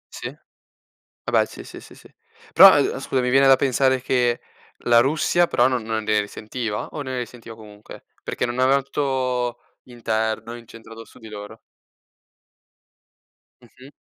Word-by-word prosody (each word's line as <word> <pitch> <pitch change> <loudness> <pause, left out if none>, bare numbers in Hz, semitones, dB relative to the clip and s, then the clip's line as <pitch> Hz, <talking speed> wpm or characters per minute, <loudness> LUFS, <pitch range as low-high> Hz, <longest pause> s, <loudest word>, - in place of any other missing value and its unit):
Sì. - - -6 0.9
Vabbè - - +2
sì, - - -11
sì, - - -11
sì, - - -15
sì. - - -19 0.4
Però, 190 -5 +9
eh, 135 -2 0
scusa 130 -1 -1
mi 125 - -1
viene 135 +2 +4
da 135 - +7
pensare 130 0 +1
che 125 -2 0 0.4
la 120 -1 +5
Russia 155 +6 +2
però 120 -4 +3
non 125 -3 -2
non 110 0 -3
ne 105 0 +1
risentiva? 105 +1 -5
O 150 - -6
ne 130 -2 -5
risentiva 115 -1 -9
comunque, 105 -1 -14 0.2
perché - - -3
non 120 +1 -4
aveva 135 +2 +3
tutto 130 -3 -2 0.2
interno 115 -1 -3
incentrato 115 -1 -13
su - - -19
di 110 - -12
loro. 105 -1 -10 2.0
Mh-mh. 130 +4 -17
120 Hz, 150 wpm, -22 LUFS, 110-130 Hz, 2.0 s, Però